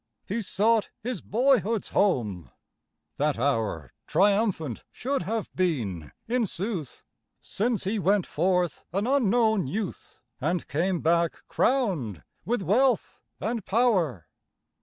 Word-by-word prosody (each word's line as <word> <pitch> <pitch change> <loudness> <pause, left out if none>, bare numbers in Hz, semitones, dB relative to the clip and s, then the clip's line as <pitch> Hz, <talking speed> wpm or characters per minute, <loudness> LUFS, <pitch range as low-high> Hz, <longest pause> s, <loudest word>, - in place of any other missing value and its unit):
He 220 +4 -1
sought 215 +2 +2
his 245 -5 -3
boyhood's 230 -2 +2
home. 110 - +1 0.7
That 150 -2 +1
hour 115 - -1
Triumphant 200 - +1
should 275 +3 -2
have 215 +4 -3
been, 115 - -1 0.2
in 235 -1 +1
sooth, 185 - -4 0.4
Since 225 +1 -1
he 205 +3 -1
went 195 +1 +2
forth, 175 -2 0
an 200 +3 0
unknown 225 - +3
youth, 200 +5 -5 0.2
And 165 +5 -1
came 175 +4 0
back 170 0 +1
crowned 170 - 0 0.2
with 235 -2 0
wealth 245 +5 +2 0.2
and 225 0 -2
power. 185 - +1
195 Hz, 115 wpm, -27 LUFS, 155-225 Hz, 0.7 s, unknown